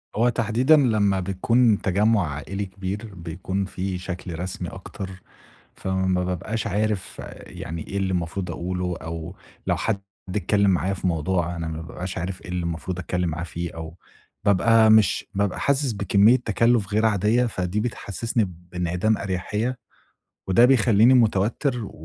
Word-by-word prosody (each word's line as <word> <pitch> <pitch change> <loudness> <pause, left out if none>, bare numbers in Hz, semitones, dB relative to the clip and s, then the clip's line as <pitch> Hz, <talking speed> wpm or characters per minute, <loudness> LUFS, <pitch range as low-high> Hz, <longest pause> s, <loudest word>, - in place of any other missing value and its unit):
هو 120 +3 +3
تحديدًا 125 +5 +3
لمّا 105 -7 +3
بتكون 105 +4 +2
تَجمُّع 100 -1 +2
عائلي 95 +8 -4
كبير، 95 +3 -6
بيكون 95 +3 -3
في 95 0 -3
شكل 90 -2 -6
رسمي 90 +1 -4
أكتر، 95 -1 -8 0.5
فما 95 -1 0
بابقاش 90 +5 -3
عارف 105 0 -1 0.3
يعني 80 0 -7
إيه 100 - -5
اللي 95 -1 0
المفروض 90 +1 -2
أقوله، 90 +1 -3
أو 80 +2 -6 0.3
لو - - +2
حد 105 -3 -1 0.3
اتكلّم 100 +1 +2
معايا 95 +1 +1
في 95 - -4
موضوع، 85 +1 0
أنا 80 -1 -3
ما 80 0 -5
بابقاش 90 +3 -6
عارف 90 +2 -4
إيه - - -11
اللي 90 0 -2
المفروض 85 +2 -4
أتكلّم 90 0 -1
معاه 85 +2 -4
فيه، 85 0 -5
أو 80 0 -7 0.5
بابقى 110 +2 +5
مش 110 -4 +4
بابقى 100 -1 0
حاسِس 140 -2 +1
بكمية 100 +3 +4
تَكَلُّف 115 -3 +1
غير 110 +1 +3
عاديّة، 110 +4 +2
فدي 95 -1 -2
بتحسِّسني 115 0 -1 0.3
بانعدام 90 +4 0
أريحيّة، 105 +6 -2 0.7
وده 95 +6 +6
بيخلّيني 120 -1 +5
مُتوتِّر 115 +2 +2
و - - -8
95 Hz, 145 wpm, -24 LUFS, 90-110 Hz, 0.7 s, وده